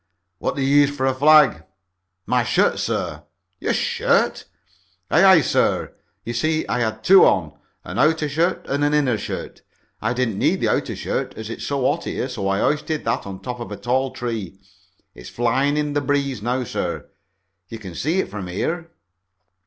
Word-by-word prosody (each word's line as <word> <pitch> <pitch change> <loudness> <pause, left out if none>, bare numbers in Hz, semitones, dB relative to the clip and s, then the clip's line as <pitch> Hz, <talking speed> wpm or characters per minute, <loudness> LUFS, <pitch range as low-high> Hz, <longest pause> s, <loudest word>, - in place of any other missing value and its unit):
"What - - -2
did 140 - -1
you 140 +2 +3
use 145 -1 +5
for 145 -2 -2
a 135 - +2
flag?" 140 - +5 0.6
"My 125 +2 +1
shirt, - - +2
sir." 75 0 -2 0.4
"Your - - 0
shirt?" - - +1 0.7
"Aye, 170 - +5
aye, 190 -4 +7
sir. - - 0 0.3
You 120 - -4
see 155 +6 0
I 125 - -1
had 110 -2 -2
two 195 +1 +7
on, 80 -5 +2 0.3
an - - -5
outer 155 0 +3
shirt 160 +5 0
and 140 +1 -1
an 145 +1 +2
inner 130 -7 +1
shirt. - - -6 0.4
I 115 +3 0
didn't 120 -5 -1
need - - +2
the - - +1
outer - - -1
shirt - - -3
as 110 +1 -6
it's - - -6
so 140 -1 -1
hot 165 +4 -1
here, - - -3
so 120 -7 -4
I 100 0 0
hoisted 150 +1 -1
that 115 -3 -1
on 95 -1 -8
top 125 +4 -6
of 120 - -7
a 105 - -5
tall 130 +2 0
tree. 115 -7 -5 0.6
It's 60 - -11
flying 130 +5 +1
in 150 -1 -1
the 145 - +1
breeze 140 -4 -1
now, 125 +3 -1
sir. 120 - -4 0.6
You 115 - -7
can 95 -5 -9
see 155 - -1
it - - -7
from 100 -3 -6
here." 165 - -3
130 Hz, 190 wpm, -21 LUFS, 110-145 Hz, 0.7 s, aye